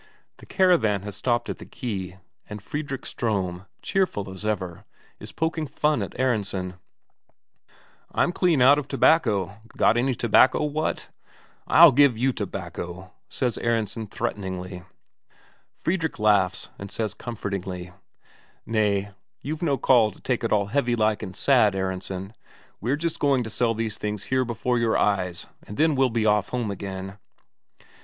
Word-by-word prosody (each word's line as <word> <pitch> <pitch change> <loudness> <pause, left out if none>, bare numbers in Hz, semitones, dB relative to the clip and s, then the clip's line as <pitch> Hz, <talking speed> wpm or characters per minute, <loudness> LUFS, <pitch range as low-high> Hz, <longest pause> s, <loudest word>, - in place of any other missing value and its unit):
The - - -15
caravan 160 - +3
has 105 -2 -6
stopped 120 +1 0
at - - -5
the - - -8
quay, 95 -7 -5 0.3
and 105 0 -6
Fredrik 140 +4 -5
Ström, 95 -4 -2 0.2
cheerful 170 - 0
as 95 +2 -9
ever, 95 -5 -3 0.4
is - - -10
poking 160 -1 -2
fun 150 +2 +1
at - - -6
Aronsen: 100 -7 -1 1.3
"I'm 175 - +2
clean 175 -7 +3
out 140 +3 +7
of 145 - -6
tobacco; 105 - +2 0.2
got 115 - +4
any 130 +1 +1
tobacco, 120 +5 +4
what?" 150 +1 -2 0.6
"I'll 170 -2 +8
give 140 -3 +4
you 130 +3 +1
tobacco," 90 -2 -6 0.2
said 125 -3 -2
Aronsen 115 -1 -1
threateningly. 95 -5 -4 1.0
Fredrik 170 -2 -1
laughs, 100 -4 +2
and 100 - -7
says 110 +1 -3
comfortingly: 95 -6 -5 0.7
"Nay, 105 -2 0 0.3
you've 155 +4 -4
no 145 -5 +1
call 120 -3 +4
to - - -15
take 125 -3 -1
it 115 - -1
all 105 -2 +3
heavy 120 +3 0
like 110 -2 +1
and 95 -4 -7
sad, 120 -8 +4
Aronsen. 95 +1 -4 0.5
We're 125 +7 0
just 165 +1 -3
going 140 -3 +2
to 110 - -7
sell 115 +1 +1
these 110 -1 -3
things 105 -1 -3
here 130 0 0
before 120 +1 -1
your 115 -1 +2
eyes, 90 -4 0 0.2
and 105 - -8
then 160 0 +3
we'll 135 -1 +3
be 115 -1 0
off 105 -2 +2
home 120 -4 -2
again." 95 0 -6
110 Hz, 150 wpm, -25 LUFS, 100-130 Hz, 1.3 s, I'll